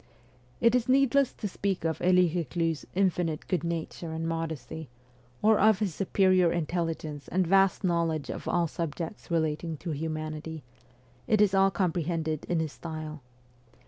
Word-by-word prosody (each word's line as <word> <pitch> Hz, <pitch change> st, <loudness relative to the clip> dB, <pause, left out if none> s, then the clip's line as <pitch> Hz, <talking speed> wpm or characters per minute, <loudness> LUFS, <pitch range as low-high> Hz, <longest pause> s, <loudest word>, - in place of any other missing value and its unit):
It 230 Hz, 0 st, +4 dB
is 250 Hz, -1 st, +1 dB
needless 275 Hz, 0 st, +4 dB
to 210 Hz, -, -4 dB
speak 195 Hz, -2 st, -2 dB
of 160 Hz, -1 st, -1 dB
Elie 180 Hz, 0 st, +5 dB
Eeclus's 165 Hz, -2 st, -2 dB
infinite 175 Hz, -5 st, 0 dB
good 180 Hz, -, 0 dB
nature 170 Hz, 0 st, -4 dB
and 165 Hz, 0 st, -3 dB
modesty, 160 Hz, -2 st, -4 dB, 0.5 s
or 215 Hz, 0 st, +5 dB
of 215 Hz, -1 st, +5 dB
his 200 Hz, -4 st, -1 dB
superior 185 Hz, -1 st, +3 dB
intelligence 165 Hz, -3 st, -3 dB
and 185 Hz, 0 st, +1 dB
vast 195 Hz, +3 st, +3 dB
knowledge 170 Hz, -4 st, 0 dB
of -, -, -7 dB
all 175 Hz, -1 st, +2 dB
subjects 165 Hz, +3 st, -5 dB
relating 160 Hz, -1 st, -1 dB
to 170 Hz, +3 st, -5 dB
humanity; 155 Hz, 0 st, -4 dB, 0.6 s
it 215 Hz, -, +3 dB
is 205 Hz, -2 st, +4 dB
all 195 Hz, 0 st, +5 dB
comprehended 165 Hz, -4 st, -1 dB
in 175 Hz, -, 0 dB
his 155 Hz, -2 st, -3 dB
style. 155 Hz, -2 st, -7 dB
170 Hz, 145 wpm, -28 LUFS, 160-190 Hz, 0.6 s, Elie